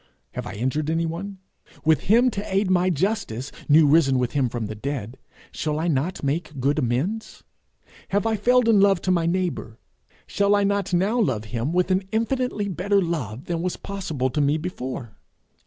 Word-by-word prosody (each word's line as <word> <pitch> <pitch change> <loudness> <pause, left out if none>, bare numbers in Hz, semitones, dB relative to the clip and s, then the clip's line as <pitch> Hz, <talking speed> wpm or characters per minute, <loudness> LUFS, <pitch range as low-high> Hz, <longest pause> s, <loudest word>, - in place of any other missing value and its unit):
Have - - -6
I - - -6
injured 130 +7 -1
anyone? 165 +4 -2 0.5
With 160 -1 +3
him 240 +5 +4
to 200 -1 -4
aid 195 0 +1
my 180 0 +3
justice, 165 - -1 0.2
new 155 +2 +7
risen 140 -3 +4
with 125 -1 0
him 135 -4 +1
from 115 -1 -3
the 105 - -5
dead, 120 0 -5 0.4
shall 150 -1 -2
I 165 - -1
not 160 +3 -1
make 150 0 -2
good 140 +4 +1
amends? 145 - -2 0.7
Have 200 +2 0
I 225 -1 +2
failed 245 +3 +3
in 220 -3 +5
love 195 -2 +4
to 185 - +1
my 170 -2 +2
neighbour? 175 -10 -2 0.5
Shall 200 0 +2
I 205 - +2
not 200 -1 0
now 195 +7 +2
love 130 - +1
him 120 +5 -3
with 180 +2 +1
an 185 +1 +3
infinitely 230 -1 -1
better 200 +2 +1
love 145 - -3
than 170 -1 -2
was 180 0 -2
possible 160 -10 -3
to 150 - 0
me 145 +2 +2
before? 130 - -6
170 Hz, 185 wpm, -24 LUFS, 135-200 Hz, 0.7 s, new